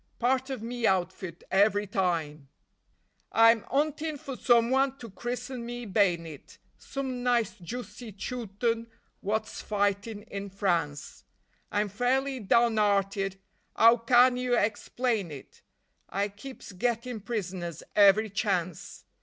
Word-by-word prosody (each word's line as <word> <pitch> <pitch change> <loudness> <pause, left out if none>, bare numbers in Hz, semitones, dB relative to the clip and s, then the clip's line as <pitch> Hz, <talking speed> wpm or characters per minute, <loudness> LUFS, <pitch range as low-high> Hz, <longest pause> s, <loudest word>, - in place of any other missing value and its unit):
Part 260 +2 +1
of 260 -5 -4
me 235 0 -1
outfit 185 -2 -1
every 205 +1 +3
time. 165 -8 -2 0.8
I'm 230 -1 +5
'untin' 305 +2 0
for 270 -1 -7
someone 260 +3 +3
to 230 -5 -10
christen 240 +4 -5
me 240 0 -6
bay'nit, 175 -7 -1 0.2
Some 265 -2 -4
nice 240 -4 +1
juicy 240 +4 -7
Chewton 230 +1 -2 0.3
wot's 215 +2 -2
fightin' 205 +1 -1
in 200 -2 -6
France; 175 -7 -2 0.5
I'm 205 +1 +1
fairly 260 +6 0
down 230 +1 +3
'earted 195 -1 +1 0.4
'ow 230 +2 +7
CAN 245 +2 +5
yer 250 -1 +1
explain 220 -1 0
it? 145 -3 -11 0.5
I 200 +1 -1
keeps 230 +6 -10
gettin' 235 +3 -2
prisoners 185 -7 -4
every 205 +1 +6
chance. 185 -4 -2
220 Hz, 115 wpm, -28 LUFS, 195-245 Hz, 0.8 s, ow